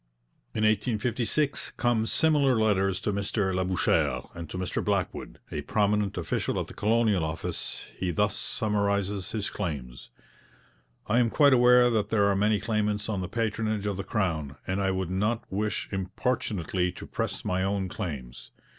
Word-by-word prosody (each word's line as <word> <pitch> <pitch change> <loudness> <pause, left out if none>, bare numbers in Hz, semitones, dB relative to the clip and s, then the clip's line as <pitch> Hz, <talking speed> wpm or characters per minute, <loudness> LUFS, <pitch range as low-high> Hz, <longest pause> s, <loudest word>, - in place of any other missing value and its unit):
In 110 - 0
1856 120 +6 0
come 120 -2 +1
similar 145 -4 +3
letters 95 -4 +2
to 105 -2 -1
Mr 100 -1 0
Labouchere; 95 -1 +1
and 85 -2 -7
to 90 - -5
Mr 90 -1 -2
Blackwood, - - -2
a 75 - -3
prominent 105 +4 +1
official 85 - -1
at - - -2
the - - -11
Colonial 110 -4 +2
Office, 80 +1 -4
he 90 - -2
thus 85 - +1
summarizes 100 -2 0
his 105 -3 -3
claims: 70 -11 -5 1.0
'I 115 +3 +2
am 120 -2 +3
quite 140 +2 +5
aware 125 0 +6
that 105 -2 0
there 105 -3 +3
are 100 -1 +3
many 105 +1 +2
claimants 105 0 -1
on 100 -3 -1
the 90 - -4
patronage 110 -2 -1
of 100 -1 -1
the 100 - -4
Crown, 80 -11 -1
and 95 +2 -1
I 95 - +1
would 95 -2 -2
not 105 +5 0
wish 105 +2 -1
importunately 95 - -1
to - - -9
press - - -3
my 90 0 0
own 95 0 0
claims. 70 - -6
100 Hz, 160 wpm, -28 LUFS, 95-110 Hz, 1.0 s, aware